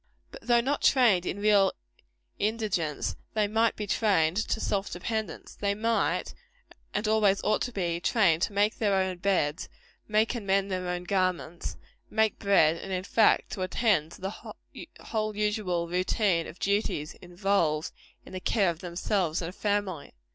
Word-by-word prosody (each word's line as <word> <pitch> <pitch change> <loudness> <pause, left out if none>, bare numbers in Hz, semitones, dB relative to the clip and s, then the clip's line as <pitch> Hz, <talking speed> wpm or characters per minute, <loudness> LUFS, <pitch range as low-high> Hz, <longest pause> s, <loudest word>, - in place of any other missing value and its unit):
But - - -11
though 240 -1 +3
not 280 +4 -1
trained 220 -10 +4
in - - -2
real 205 -2 +4 0.7
indigence, 205 -8 -1 0.2
they 210 -1 +2
might 225 +2 +2
be 210 - -4
trained 190 -6 +2
to 220 0 -1
self 200 -2 -1
dependence. 220 +5 -4
They 200 0 -1
might 225 +2 0
be, 485 0 -26 0.2
and 210 +1 0
always 210 -3 +3
ought 215 - +1
to 245 - -2
be, 175 -6 -2
trained 175 -4 +2
to 205 - 0
make 205 +2 +1
their 205 -3 +2
own 190 -1 0
beds; 175 -4 0 0.4
make 215 +2 +2
and 225 -5 -6
mend 195 0 +1
their 185 -1 -2
own 180 0 -3
garments; 180 -3 -2 0.3
make 220 -1 +1
bread; 170 -5 +4
and, 195 - -8
in 185 -1 -2
fact, 220 +2 +3
to 190 - -5
attend 185 -4 +1
to - - -14
the 195 +2 -7 0.5
whole 215 -1 -2
usual 205 -5 -1
routine 180 0 +1
of 170 - -10
duties 195 -7 -1
involved 175 -4 0 0.3
in - - -12
the 185 - -4
care 195 -1 +2
of 165 - -10
themselves 175 -1 -1
and 165 - -3
a - - -10
family. 200 -7 -2
195 Hz, 170 wpm, -28 LUFS, 175-215 Hz, 0.7 s, trained